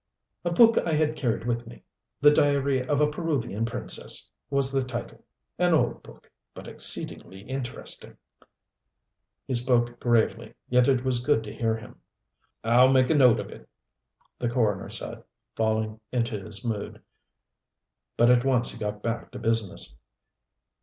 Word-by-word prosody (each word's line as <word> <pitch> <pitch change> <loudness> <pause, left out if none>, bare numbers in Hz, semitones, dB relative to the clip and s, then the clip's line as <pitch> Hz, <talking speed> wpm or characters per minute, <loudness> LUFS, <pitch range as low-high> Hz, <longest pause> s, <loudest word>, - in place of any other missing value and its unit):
"A 175 - 0
book 230 +6 +6
I 165 - -1
had 155 0 +1
carried 115 -6 -1
with 120 0 -2
me. - - -13 0.4
'The 145 0 +7
diary 140 -2 +2
of 145 +2 0
a 150 - +4
Peruvian 150 - -2
Princess' 115 - -1 0.2
was 140 -1 +2
the 135 -1 +1
title. 125 -2 -6 0.4
An - - +4
old - - 0
book - - -17 0.2
but - - -10
exceedingly 95 0 -2
interesting." 130 +2 -6 1.3
He 135 - -3
spoke 120 -1 +1
gravely, 115 -1 +1
yet 125 0 +3
it 130 -2 +2
was 125 -2 +1
good 135 -4 +2
to 105 - -8
hear 115 -1 0
him. 110 - -13 0.6
"I'll 125 +3 +5
make 130 0 +4
a - - +5
note 125 -5 +5
of - - -6
it," - - -13 0.7
the 120 - -1
coroner 110 -5 0
said, - - -6 0.3
falling 110 -1 -1
into 115 -5 -2
his 105 +1 -5
mood. 110 -3 -4 1.1
But 120 +1 +5
at 120 -1 +4
once 130 -3 +2
he 115 - -10
got 105 -1 -4
back 115 0 -3
to - - -6
business. 115 - -1
120 Hz, 155 wpm, -26 LUFS, 115-135 Hz, 1.3 s, The